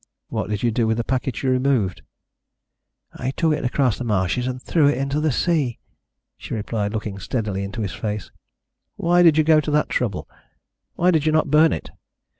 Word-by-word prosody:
"What - - -3
did 105 0 -3
you 120 - +2
do 115 0 +1
with 110 0 +1
the 120 - 0
packet 130 +1 -2
you 130 - +2
removed?" 125 -7 +1 1.1
"I 130 - -4
took 160 +3 +1
it 150 - -3
across 125 -2 +1
the - - -3
marshes 105 +2 0
and 130 0 -3
threw 150 +3 +2
it 145 - +2
into 140 +2 -1
the 155 0 +1
sea," 145 -4 0 0.6
she - - -5
replied, 105 -1 -2
looking 105 -2 -4
steadily 105 -4 -3
into 100 +3 -5
his 95 -4 -4
face. 105 -2 -4 0.6
"Why 175 +1 +3
did 165 -3 +6
you 155 - +5
go 155 0 +5
to 150 - -4
that 150 0 +1
trouble? 110 -7 -2 0.7
Why 180 +2 +3
did 160 -2 +1
you - - +4
not 155 -2 +1
burn 155 +1 +5
it?" - - -5
125 Hz, 200 wpm, -22 LUFS, 110-150 Hz, 1.1 s, did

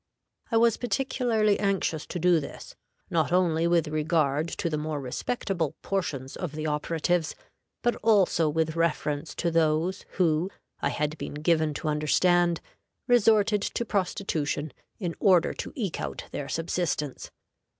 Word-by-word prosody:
I 225 - +3
was 230 -1 +4
particularly 235 -3 +1
anxious 195 -6 0
to - - -4
do 175 -1 +4
this, 145 - -9 0.4
not 160 -3 +1
only 170 -2 +3
with 170 -2 +2
regard 155 -1 +1
to 170 - -3
the 155 -2 -1
more 155 -1 -3
respectable 160 - -2
portions 145 -9 -3
of 175 -5 -5
the 155 0 -4
operatives, 160 +2 0 0.5
but 240 -2 +2
also 195 -7 +3
with 160 +1 0
reference 155 -2 -1
to 170 - 0
those 165 +3 +1
who, 170 -1 +2 0.3
I - - +1
had 150 +1 -2
been - - -5
given 155 0 +1
to 160 - -4
understand, 170 +3 +2 0.5
resorted 220 -3 +4
to 235 - -2
prostitution 165 - -1 0.2
in 175 -6 -3
order 180 -4 +4
to - - -6
eke 200 -9 -3
out - - -4
their 140 - -5
subsistence. 165 -4 -2
170 Hz, 140 wpm, -27 LUFS, 155-195 Hz, 0.5 s, was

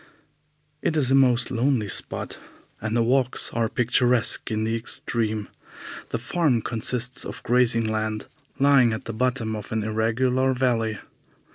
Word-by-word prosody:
It 160 - 0
is 135 -3 +1
a - - +4
most 130 -2 +3
lonely 125 -3 +1
spot, - - -3 0.4
and 110 +2 -1
the 115 - +3
walks 130 +1 +1
are 115 -1 0
picturesque 120 0 +1
in 110 0 -1
the 115 +1 0
extreme. 110 -2 -2 0.6
The - - -2
farm 150 -10 0
consists 125 +2 0
of - - -7
grazing 120 -2 +3
land 110 0 -2 0.3
lying 135 -4 +4
at 110 - -6
the 115 - -5
bottom 120 -1 -1
of 105 -2 -8
an 110 -1 -1
irregular 125 +4 +1
valley. 115 -4 0
120 Hz, 145 wpm, -24 LUFS, 110-130 Hz, 0.6 s, a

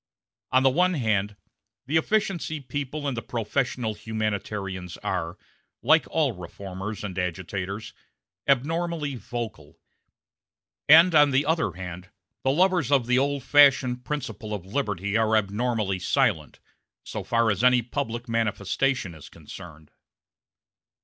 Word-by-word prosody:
On 130 +1 +4
the 135 - +6
one 180 +5 +2
hand, 105 -6 0 0.5
the 145 - -2
efficiency 175 -4 0
people 145 +1 -4
and 135 - -1
the 115 - -3
professional 120 0 -2
humanitarians 105 -4 -4
are, 85 +3 -2 0.5
like 155 +6 +4
all 155 -5 +1
reformers 95 +2 -7
and 95 -2 -4
agitators, 95 +4 -4 0.5
abnormally 155 +2 0
vocal; 115 - -7 1.1
and 165 +4 +8
on 150 -2 +6
the 135 +1 +2
other 160 +2 +1
hand 90 0 -8 0.3
the 130 - 0
lovers 175 -1 +2
of 135 -4 +4
the 125 +1 +3
old 140 -1 0
fashioned 135 -3 +4
principle 120 -7 -4
of 95 -3 -8
liberty 100 -3 -2
are 110 0 +3
abnormally 105 -1 -1
silent, - - 0 0.4
so - - -6
far 115 -1 +2
as 105 +3 -2
any 125 -1 +5
public 120 -1 -4
manifestation 115 -1 0
is 80 -3 -12
concerned. 80 -3 -12
115 Hz, 125 wpm, -25 LUFS, 100-140 Hz, 1.1 s, and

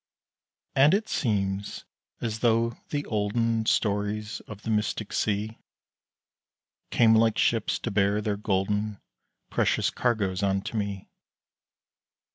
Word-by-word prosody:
And 145 +7 +6
it 215 +2 -1
seems 100 -4 -1 0.4
as 110 -2 -2
though 115 0 +2
the 145 -1 -2
olden 110 +1 0
Stories 105 +1 0
of 105 -1 -10
the 115 - -2
mystic 105 -1 -1
sea 105 +1 -1 1.3
Came 115 -2 +5
like 110 -1 +4
ships 115 -2 +2
to 115 - -4
bear 100 0 +2
their 105 -1 -1
golden, 105 +1 -1 0.5
Precious - - +1
cargoes 105 -6 0
unto 100 +2 -1
me. 100 -3 -3
105 Hz, 110 wpm, -27 LUFS, 100-115 Hz, 1.3 s, And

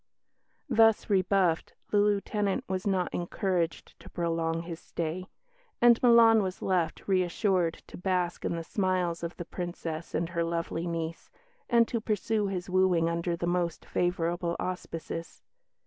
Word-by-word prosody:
Thus 225 -1 +4
rebuffed, 185 -3 +2 0.2
the 205 - +4
Lieutenant 205 -1 +1
was 190 +1 -2
not 185 -3 0
encouraged 175 -1 -2
to - - -13
prolong 165 -1 -1
his 170 -1 -7
stay; 170 +3 -4 0.5
and 235 -1 +6
Milan 230 -2 +7
was 190 -2 -3
left, 175 -4 0
reassured, 185 -2 +1
to - - -11
bask 180 -1 -1
in - - -1
the 165 - -4
smiles 180 -2 0
of 170 0 -5
the 175 - -5
Princess 170 -2 -5
and 165 +1 0
her 170 -1 -1
lovely 165 0 -2
niece, 165 -1 -4 0.4
and 235 -1 +5
to 230 - -2
pursue 215 0 0
his 185 -2 -3
wooing 180 -3 +3
under 170 +1 -1
the 170 - -3
most 175 -1 -1
favourable 175 -1 -1
auspices. 165 -2 -5
180 Hz, 145 wpm, -29 LUFS, 170-195 Hz, 0.5 s, Milan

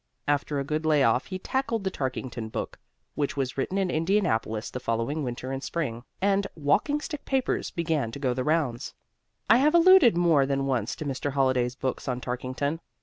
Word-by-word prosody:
After 145 0 0
a - - -1
good 155 +3 -2
lay 155 -3 +3
off 115 0 +2
he 185 - -4
tackled 230 +1 -2
the 190 - -1
Tarkington 130 -6 -4
book, - - -5 0.3
which 145 -1 -2
was 130 -2 -1
written 160 +8 -2
in 190 -2 +1
Indianapolis 155 - 0
the 125 - -4
following 120 +5 -1
winter 125 +1 -4
and 135 0 -3
spring. 135 -8 -3 0.2
And 200 +1 +2
"Walking 165 - +1
Stick 300 -1 -6
Papers" 265 -1 -1
began 160 -8 -1
to - - -5
go 130 -3 0
the 130 +1 -2
rounds. 150 -6 -1 0.5
I 225 - +7
have 300 +5 +3
alluded 340 - +7
more 165 -6 +4
than 135 0 0
once 125 -5 -1
to 155 - -6
Mr. 140 0 -3
Holliday's 130 -3 +1
book 130 0 -3
on 125 -1 -1
Tarkington. 130 +5 -3
145 Hz, 190 wpm, -27 LUFS, 130-185 Hz, 0.5 s, I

